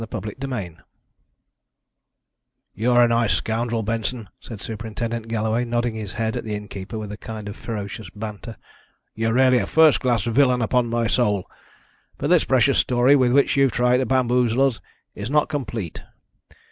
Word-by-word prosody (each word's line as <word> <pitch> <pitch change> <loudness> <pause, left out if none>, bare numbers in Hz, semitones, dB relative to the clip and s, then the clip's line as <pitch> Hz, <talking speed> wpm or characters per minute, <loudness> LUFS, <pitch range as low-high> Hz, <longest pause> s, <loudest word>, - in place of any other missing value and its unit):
CHAPTER 105 - -4
XXVIII 115 -11 -5 2.0
"You're 120 +3 +3
a - - +5
nice 115 -2 +2
scoundrel, 115 0 -2
Benson," 115 0 -3
said 110 -4 -10
Superintendent 115 +1 -5
Galloway, 110 +1 0
nodding 120 0 -1
his 110 -3 -6
head 110 -1 -2
at - - -3
the 110 -1 -4
innkeeper 105 0 -7
with 105 -1 -6
a 105 - -7
kind 110 -2 -8
of 105 - -6
ferocious 105 -4 -6
banter. 110 +1 -7 0.6
"You're 115 0 -1
really 130 -1 +5
a 100 - -2
first 160 -2 +5
class 120 -5 +1
villain, 125 +1 +2
upon 125 +2 +1
my 115 0 0
soul! 105 -5 +1 0.7
But - - -2
this - - +4
precious - - +3
story 125 +3 +4
with 130 -3 +3
which 140 +2 +3
you've 135 -3 +3
tried 125 +1 +3
to 130 -1 -1
bamboozle 125 -1 +2
us 130 -5 -1 0.3
is 105 +3 -6
not 150 +2 +2
complete. 115 - -4
115 Hz, 160 wpm, -22 LUFS, 110-125 Hz, 2.0 s, a